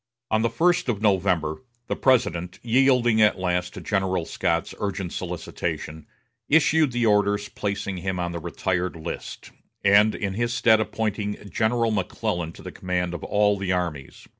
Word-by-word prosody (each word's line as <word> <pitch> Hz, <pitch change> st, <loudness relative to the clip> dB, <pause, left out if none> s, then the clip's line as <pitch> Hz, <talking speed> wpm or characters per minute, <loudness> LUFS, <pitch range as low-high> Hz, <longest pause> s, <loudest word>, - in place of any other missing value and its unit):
On 110 Hz, 0 st, +3 dB
the 115 Hz, -, +2 dB
first 175 Hz, -2 st, +2 dB
of 110 Hz, -5 st, 0 dB
November 95 Hz, -6 st, +1 dB, 0.2 s
the -, -, -2 dB
President, 90 Hz, -9 st, +1 dB
yielding 120 Hz, -2 st, +3 dB
at 105 Hz, -, +4 dB
last 90 Hz, -1 st, -1 dB
to -, -, -7 dB
General 95 Hz, -4 st, 0 dB
Scott's 85 Hz, 0 st, -1 dB
urgent 95 Hz, -3 st, -3 dB
solicitation, 85 Hz, -3 st, -5 dB, 0.4 s
issued 160 Hz, -1 st, +4 dB
the 120 Hz, -1 st, 0 dB
orders 105 Hz, -1 st, +2 dB
placing 100 Hz, -2 st, -3 dB
him 95 Hz, 0 st, -3 dB
on 85 Hz, -1 st, -2 dB
the 85 Hz, -, -4 dB
retired 90 Hz, +2 st, -2 dB
list, 80 Hz, +1 st, -7 dB, 0.3 s
and 100 Hz, +2 st, +5 dB
in 100 Hz, -2 st, -3 dB
his 120 Hz, +3 st, -1 dB
stead 110 Hz, -2 st, +5 dB
appointing 105 Hz, -1 st, -3 dB
General 115 Hz, +4 st, +1 dB
McClellan 85 Hz, -4 st, -2 dB
to -, -, -13 dB
the -, -, -7 dB
command 90 Hz, -1 st, -2 dB
of 85 Hz, -, -6 dB
all 105 Hz, -1 st, +2 dB
the 95 Hz, -1 st, -1 dB
armies. 85 Hz, -7 st, -3 dB
100 Hz, 160 wpm, -24 LUFS, 90-110 Hz, 0.4 s, and